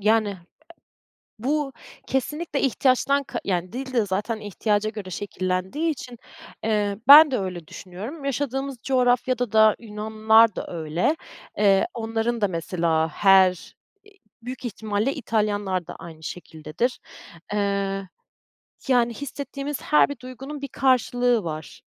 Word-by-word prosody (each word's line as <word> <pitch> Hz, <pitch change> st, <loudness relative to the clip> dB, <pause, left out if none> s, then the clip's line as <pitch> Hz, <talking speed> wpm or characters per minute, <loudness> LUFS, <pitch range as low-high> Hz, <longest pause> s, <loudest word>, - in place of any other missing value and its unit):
yani, 215 Hz, -1 st, +2 dB, 1.0 s
bu 275 Hz, +3 st, -1 dB, 0.3 s
kesinlikle 295 Hz, +3 st, -2 dB
ihtiyaçtan 275 Hz, +2 st, +2 dB
ka -, -, -5 dB
yani, 180 Hz, +1 st, -2 dB
dil 260 Hz, +1 st, -5 dB
de 230 Hz, -4 st, +2 dB
zaten 205 Hz, +4 st, -2 dB
ihtiyaca 210 Hz, +1 st, -1 dB
göre 210 Hz, -4 st, -7 dB
şekillendiği 185 Hz, -, -2 dB
için, 250 Hz, -4 st, -8 dB, 0.5 s
eee, 210 Hz, -2 st, 0 dB
ben 295 Hz, +1 st, +10 dB
de 255 Hz, -, +1 dB
öyle 180 Hz, -4 st, -5 dB
düşünüyorum. 215 Hz, -, -8 dB
Yaşadığımız 275 Hz, 0 st, -2 dB
coğrafyada 250 Hz, -2 st, +1 dB
da 220 Hz, -1 st, +5 dB
Yunanlılar 220 Hz, 0 st, +3 dB
da -, -, -5 dB
öyle, 170 Hz, -, -1 dB, 0.4 s
eee, 200 Hz, -, +4 dB
onların 225 Hz, 0 st, -2 dB
da 205 Hz, -, +3 dB
mesela, 165 Hz, -2 st, 0 dB
her 190 Hz, +2 st, +5 dB
i 180 Hz, -, -16 dB, 0.5 s
büyük 255 Hz, +1 st, -6 dB
ihtimalle 220 Hz, +2 st, -1 dB
İtalyanlar 205 Hz, -, -1 dB
da -, -, -8 dB
aynı 160 Hz, -1 st, -11 dB
şekildedir. 165 Hz, +8 st, -4 dB, 0.5 s
Eee, 200 Hz, -1 st, -1 dB, 0.8 s
yani, 240 Hz, -2 st, +3 dB
hissettiğimiz 280 Hz, +1 st, -5 dB
her 300 Hz, -, +4 dB
bir 285 Hz, -, -6 dB
duygunun 270 Hz, +3 st, -8 dB
bir 280 Hz, -, -4 dB
karşılığı 245 Hz, -3 st, +2 dB
var. 155 Hz, -2 st, -6 dB
220 Hz, 125 wpm, -24 LUFS, 195-260 Hz, 1.0 s, ben